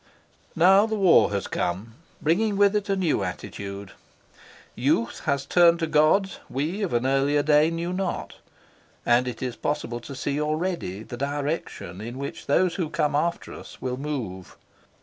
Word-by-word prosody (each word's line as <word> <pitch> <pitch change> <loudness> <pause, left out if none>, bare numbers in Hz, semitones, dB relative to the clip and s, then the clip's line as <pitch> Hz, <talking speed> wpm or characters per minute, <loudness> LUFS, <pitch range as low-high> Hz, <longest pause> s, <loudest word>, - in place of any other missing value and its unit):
Now 190 +5 +6
the 220 - -2
war 190 -5 +5
has 100 -1 -2
come, 95 +6 -3 0.3
bringing 200 +6 +2
with 205 0 +4
it 205 -1 -1
a 195 - +2
new 180 -5 +1
attitude. 100 -1 -6 0.8
Youth 120 -2 0
has 140 -2 0
turned 170 -1 +5
to 165 - -1
gods 160 +5 +2
we 155 +10 -2
of 195 - -1
an 120 +1 +1
earlier 140 +2 +2
day 150 +1 +4
knew 170 +2 -3
not, 185 -1 -3 0.7
and 120 +1 +3
it 125 0 -5
is 125 -2 -3
possible 120 -5 -3
to 140 - -9
see 140 +3 -2
already 155 - -2
the 120 - -8
direction 140 - -3
in 120 +3 -6
which 140 +1 -6
those 175 +5 +3
who 170 -5 -2
come 150 -1 0
after 170 +3 -1
us - - -11
will 125 -1 -3
move. 120 -11 -5
150 Hz, 165 wpm, -25 LUFS, 125-175 Hz, 0.8 s, Now